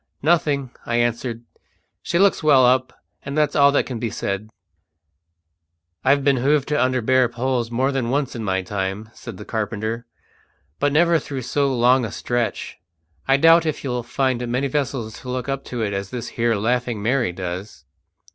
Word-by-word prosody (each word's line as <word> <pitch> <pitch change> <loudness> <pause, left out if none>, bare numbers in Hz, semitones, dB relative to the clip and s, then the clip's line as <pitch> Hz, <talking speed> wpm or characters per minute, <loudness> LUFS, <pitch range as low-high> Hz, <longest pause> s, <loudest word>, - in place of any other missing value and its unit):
"Nothing," 145 -5 +1
I 115 - -2
answered. 120 0 -1 0.6
"She 170 - -1
looks 195 +2 +3
well 140 -5 +5
up, 130 +1 +3 0.3
and 140 +2 -5
that's 150 -1 +2
all 140 -1 +6
that - - +2
can 125 -4 -5
be 115 - -2
said." 100 +1 -4 1.5
"I've 140 +1 +3
been 140 -1 +3
hove 140 +3 +2
to 150 -2 +1
under 130 -1 0
bare 130 0 +3
poles 120 -1 -1
more 130 +4 0
than 130 -4 -1
once 135 0 -1
in 115 - -4
my 95 -2 -1
time," 95 +2 -4
said - - -9
the - - -9
carpenter, 110 +1 -3 0.7
"but 145 0 +2
never 165 +2 +4
through 135 -2 -6
so 140 +3 0
long 125 +1 +3
a 110 - -4
stretch. 120 +1 -3 0.5
I 135 0 +5
doubt 165 +2 +5
if 155 - -3
you'll 125 -3 -2
find 125 0 -1
many 125 +4 0
vessels 130 -6 -3
to 130 - -9
look 125 +1 -3
up 135 0 -3
to 120 -2 -3
it 100 -2 -2
as 100 0 -3
this 120 0 -5
here 115 -1 0
Laughing 120 0 -1
Mary 120 -4 +1
does." 90 +3 -6
125 Hz, 180 wpm, -22 LUFS, 115-140 Hz, 1.5 s, all